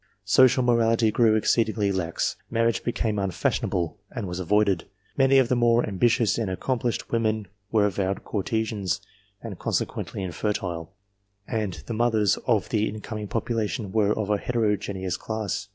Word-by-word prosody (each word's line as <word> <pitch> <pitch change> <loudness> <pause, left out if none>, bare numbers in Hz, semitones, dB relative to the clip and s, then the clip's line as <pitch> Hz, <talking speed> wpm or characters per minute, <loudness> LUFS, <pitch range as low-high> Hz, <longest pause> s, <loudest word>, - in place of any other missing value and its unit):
Social 130 0 +5
morality 115 -2 +3
grew 110 0 +4
exceedingly 110 -2 +2
lax; 90 -3 -1
marriage 115 0 +1
became 110 -3 -1
unTash 95 -2 0
ionable, 85 +3 -2
and 115 -5 -5
was 90 +1 -4
avoided; 100 -1 +2 0.3
many 135 0 +4
of 130 -2 +5
the 125 - +1
more 120 0 +3
ambitious 115 +3 +2
and 110 -4 -1
accomplished 120 +5 -2
women 110 -3 0 0.2
were 105 -2 +4
avowed 100 -1 -1
courtesans, 105 -2 -1 0.4
and 105 -6 -7
consequently 95 - -2
infertile, 90 -2 -3 0.6
and 105 - -3
the 115 - -4
mothers 110 -3 +2
of 110 -5 +2
the 110 -1 +1
incoming 105 0 -6
population 115 -2 -2
were 105 -1 +2
of 105 -1 -1
a 105 - +2
heterogeneous 105 -6 -1
class. 105 -2 -4
110 Hz, 145 wpm, -25 LUFS, 100-115 Hz, 0.6 s, Social